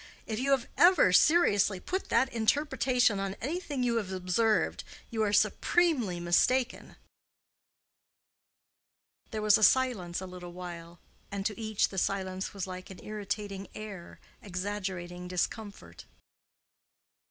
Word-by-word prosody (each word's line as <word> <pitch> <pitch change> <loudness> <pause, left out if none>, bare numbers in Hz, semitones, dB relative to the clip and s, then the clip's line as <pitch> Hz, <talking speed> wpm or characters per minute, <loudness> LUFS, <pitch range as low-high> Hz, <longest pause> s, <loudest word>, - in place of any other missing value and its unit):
If 220 -1 -3
you 270 +2 -1
have 270 -3 +2
ever 345 - +6
seriously 205 - +4
put 375 - -4
that 260 +3 +2
interpretation 245 -2 +2
on 195 0 -3
anything 290 -2 -3
you 235 -1 +1
have 200 -4 -3
observed, 190 +4 +1 0.3
you 225 -1 -1
are 210 -1 +1
supremely 215 - +2
mistaken." 240 +9 +1 2.3
There 215 -2 -4
was 215 0 +6
silence 230 -10 0
a 190 - -6
little 180 -1 -9
while, 175 -1 -8 0.3
and 200 -1 -4
to 210 0 -2
each 220 -2 0
the 190 - -3
silence 190 0 -2
was 195 -3 -4
like 185 +1 -8
an 190 - -10
irritating 205 -1 -5
air, 200 -5 -9 0.2
exaggerating 185 -2 -5
discomfort. 180 - -4
205 Hz, 120 wpm, -30 LUFS, 185-235 Hz, 2.3 s, ever